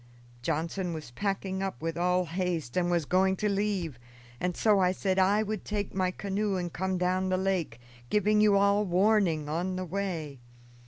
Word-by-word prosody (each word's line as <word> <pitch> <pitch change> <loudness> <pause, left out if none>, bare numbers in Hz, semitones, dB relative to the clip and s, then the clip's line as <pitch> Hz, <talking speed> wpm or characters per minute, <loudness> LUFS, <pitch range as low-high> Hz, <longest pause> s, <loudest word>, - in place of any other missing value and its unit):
Johnson 170 +7 -2
was 155 -6 -8
packing 195 +4 -2
up 195 -10 -3
with 165 0 -3
all 180 +1 +1
haste 170 -6 -2
and 175 -1 +1
was 170 -3 +1
going 190 +4 +2
to 210 - -1
leave, 195 -9 -1 0.4
and 180 0 -2
so 210 -3 +4
I 180 -1 +3
said 190 0 0
I 200 +3 +4
would 215 -1 -4
take 205 -2 -3
my 185 -1 +1
canoe 200 +2 -2
and 175 -2 -3
come 190 +1 -1
down 185 +1 0
the 185 - +1
lake, 185 -11 -1 0.3
giving 210 +1 +3
you 210 -1 +5
all 200 +1 +3
warning 185 -4 +2
on 175 +5 -2
the 185 0 -3
way. 170 -7 -4
185 Hz, 180 wpm, -29 LUFS, 175-200 Hz, 0.4 s, you